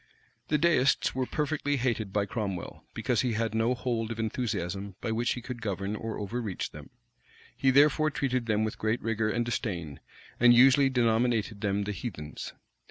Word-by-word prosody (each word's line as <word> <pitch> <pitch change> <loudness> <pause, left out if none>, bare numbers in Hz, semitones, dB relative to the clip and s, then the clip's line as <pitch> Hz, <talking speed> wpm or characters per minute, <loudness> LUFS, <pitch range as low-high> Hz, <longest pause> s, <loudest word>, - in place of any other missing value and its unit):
The 150 - +2
Deists 145 -4 +3
were 130 -1 -1
perfectly 150 -1 -1
hated 120 -5 -1
by 100 0 +1
Cromwell, 100 -4 -4
because - - +1
he 125 -3 0
had 110 -1 -1
no 115 +3 +2
hold 115 -3 -2
of 115 - -4
enthusiasm 100 -4 -3
by 115 - -3
which 115 +2 +1
he 125 - -7
could 125 -1 -6
govern 100 0 -2
or 110 0 -4
overreach 105 -1 -4
them; - - -11 0.7
he 135 - +2
therefore 150 +3 +5
treated 130 -4 -1
them 110 -1 +2
with 110 - -3
great 110 +2 0
rigor 115 -1 0
and 120 +2 0
disdain, 90 - -3 0.4
and 120 0 +7
usually 135 +2 +6
denominated 115 -3 +1
them 100 -1 0
the 105 - -3
heathens. 85 -7 -6
115 Hz, 170 wpm, -29 LUFS, 105-125 Hz, 0.7 s, and